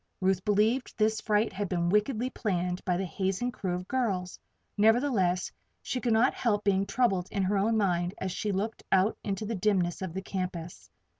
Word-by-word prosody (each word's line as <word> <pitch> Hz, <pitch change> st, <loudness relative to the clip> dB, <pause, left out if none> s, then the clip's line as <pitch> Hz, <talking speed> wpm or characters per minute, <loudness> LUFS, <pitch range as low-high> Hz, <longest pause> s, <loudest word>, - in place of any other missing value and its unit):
Ruth 190 Hz, -1 st, +1 dB
believed 215 Hz, +5 st, +1 dB
this 220 Hz, 0 st, +2 dB
fright 210 Hz, 0 st, +1 dB
had 195 Hz, 0 st, -3 dB
been 170 Hz, -2 st, 0 dB
wickedly 220 Hz, +5 st, +1 dB
planned 180 Hz, -5 st, -2 dB
by 180 Hz, -2 st, +1 dB
the 190 Hz, -, -1 dB
hazing 190 Hz, +7 st, -1 dB
crew 185 Hz, -6 st, -3 dB
of 180 Hz, +1 st, -6 dB
girls; 200 Hz, -9 st, -1 dB, 0.4 s
nevertheless 215 Hz, -5 st, +2 dB, 0.3 s
she 250 Hz, -, -3 dB
could 240 Hz, -, 0 dB
not 225 Hz, +3 st, +4 dB
help 210 Hz, -4 st, 0 dB
being 195 Hz, 0 st, +2 dB
troubled 195 Hz, -8 st, +1 dB
in 195 Hz, -, -1 dB
her 195 Hz, +2 st, +1 dB
own 220 Hz, +3 st, +2 dB
mind 180 Hz, -3 st, 0 dB
as 190 Hz, -, -3 dB
she 205 Hz, +3 st, -2 dB
looked 205 Hz, +4 st, -2 dB
out 190 Hz, +3 st, +3 dB
into 200 Hz, +1 st, -3 dB
the 225 Hz, -, -3 dB
dimness 185 Hz, -4 st, +1 dB
of 185 Hz, -2 st, -5 dB
the 190 Hz, -, -3 dB
campus. 180 Hz, -3 st, -5 dB
195 Hz, 190 wpm, -29 LUFS, 185-220 Hz, 0.4 s, not